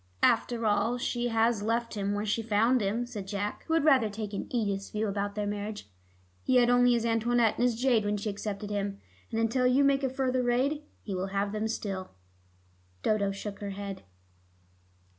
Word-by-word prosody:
"After 235 -2 +2
all, 215 +3 +2
she 245 0 -1
has 225 -1 +2
left 230 +2 -1
him 205 -1 -1
where 205 +1 -2
she 215 +2 0
found 225 +3 +2
him," 215 +5 0
said 210 -6 -7
Jack, 205 +1 -3
who 325 - +2
had 325 - +2
rather 260 -8 +5
taken 205 -1 -5
Edith's 200 -5 -1
view 215 +1 -1
about 200 0 -2
their 210 -1 -1
marriage. 205 - -5 0.5
"He 260 - +1
had 245 -1 +5
only 245 0 +5
his 235 -1 +1
Antoinette 230 0 +2
and - - +2
his 235 -2 0
jade 245 -4 +3
when 205 0 0
she 205 - -4
accepted 205 0 -5
him, 200 -1 -2 0.3
and 225 - -2
until 250 +3 +2
you 260 +3 +4
make 275 0 +3
a 265 - +2
further 260 -1 0
raid, 255 +5 +1 0.2
he 200 - -5
will 185 +1 -2
have 200 +1 -1
them 215 +1 -1
still." 195 -4 -4 0.9
Dodo 205 -2 +2
shook 200 +1 -6
her 205 - -4
head. 200 0 -6
220 Hz, 195 wpm, -29 LUFS, 205-245 Hz, 0.9 s, rather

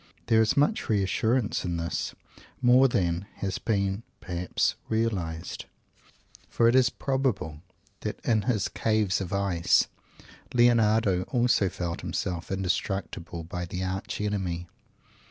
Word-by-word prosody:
There 110 -1 +4
is 110 - +2
much 210 +12 +2
reassurance 110 +3 +1
in 85 -2 -2
this. 85 0 -3 0.4
More 125 +1 +6
than 90 -5 0
has 95 -2 -3
been, 100 -2 0 0.2
perhaps, 90 0 -1 0.2
realized. 95 -8 -2 0.8
For 115 - +3
it 115 - +5
is 130 -1 +5
probable 120 - -1 0.4
that - - -4
"in 110 -3 +3
his 105 -4 0
caves 105 -4 +1
of 90 - -5
ice," 100 -4 +2 0.7
Leonardo 110 -5 +4
also 120 -6 +2
felt 85 -1 -4
himself 85 -1 -3
indestructible 95 -3 -2
by 90 +2 -5
the 90 +2 -4
Arch 95 +1 -3
Enemy. 95 -5 -2
100 Hz, 120 wpm, -27 LUFS, 90-115 Hz, 0.8 s, More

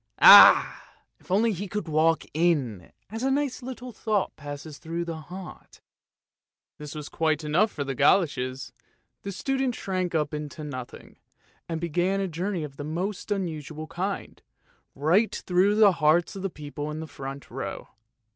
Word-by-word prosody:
Ah! - - +9 0.4
if - - -23
only 215 +5 +3
he 200 +2 -5
could 205 -2 -4
walk 160 +1 +2
in, 145 - 0 0.2
as 225 +1 -5
a 265 - +1
nice 275 -1 -1
little 250 0 -7
thought 215 -2 -1
passes 145 +1 -8
through 170 +1 -4
the 165 -1 -5
heart! 185 0 -10 0.5
" - - -67
This 150 0 -8
was 150 -1 -6
quite 160 -1 0
enough 175 +9 +2
for 145 - -4
the 135 -1 -3
goloshes, 135 -3 +1 0.5
the 200 - -5
student 265 +4 -1
shrank 185 -3 -3
up 150 -1 0
into 150 +1 -6
nothing, 130 -4 -8 0.5
and 165 -1 -2
began 175 +4 0
a 195 - -1
journey 180 +1 -3
of 140 -1 -9
a - - -4
most 180 +8 -4
unusual 155 -6 -4
kind, 190 +5 -5 0.5
right 170 +11 +2
through 190 +3 +3
the 210 -2 +6
hearts 165 +1 +2
of 195 - -6
the 195 - -2
people 150 -2 -7
in 150 +1 -5
the 160 - -5
front 135 -2 -8
row. - - -6
165 Hz, 165 wpm, -26 LUFS, 150-195 Hz, 0.5 s, Ah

